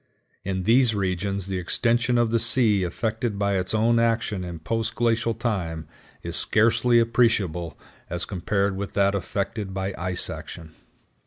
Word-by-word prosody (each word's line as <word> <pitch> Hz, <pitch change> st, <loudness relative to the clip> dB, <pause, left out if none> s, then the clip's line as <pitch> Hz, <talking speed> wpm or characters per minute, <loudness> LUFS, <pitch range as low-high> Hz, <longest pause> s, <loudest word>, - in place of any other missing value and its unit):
In 95 Hz, -1 st, -2 dB
these 115 Hz, +2 st, +4 dB
regions 95 Hz, 0 st, -2 dB
the 95 Hz, -1 st, -3 dB
extension 120 Hz, +6 st, +1 dB
of 120 Hz, -2 st, +2 dB
the 115 Hz, -, +2 dB
sea 110 Hz, -4 st, +4 dB
effected 110 Hz, +4 st, -2 dB
by 100 Hz, -1 st, +1 dB
its 90 Hz, -, -3 dB
own 115 Hz, +2 st, +3 dB
action 115 Hz, -4 st, 0 dB
in 85 Hz, -1 st, -6 dB
post 110 Hz, +7 st, -2 dB
glacial 115 Hz, -1 st, +1 dB
time 90 Hz, -9 st, -3 dB, 0.4 s
is -, -, -5 dB
scarcely 115 Hz, +2 st, +3 dB
appreciable 110 Hz, -9 st, +1 dB, 0.3 s
as 90 Hz, 0 st, -3 dB
compared 100 Hz, +1 st, -1 dB
with 100 Hz, 0 st, -5 dB
that 100 Hz, 0 st, +3 dB
effected 100 Hz, 0 st, -3 dB
by 95 Hz, 0 st, -2 dB
ice 90 Hz, 0 st, -2 dB
action. 80 Hz, -2 st, -8 dB
100 Hz, 150 wpm, -24 LUFS, 95-115 Hz, 0.4 s, these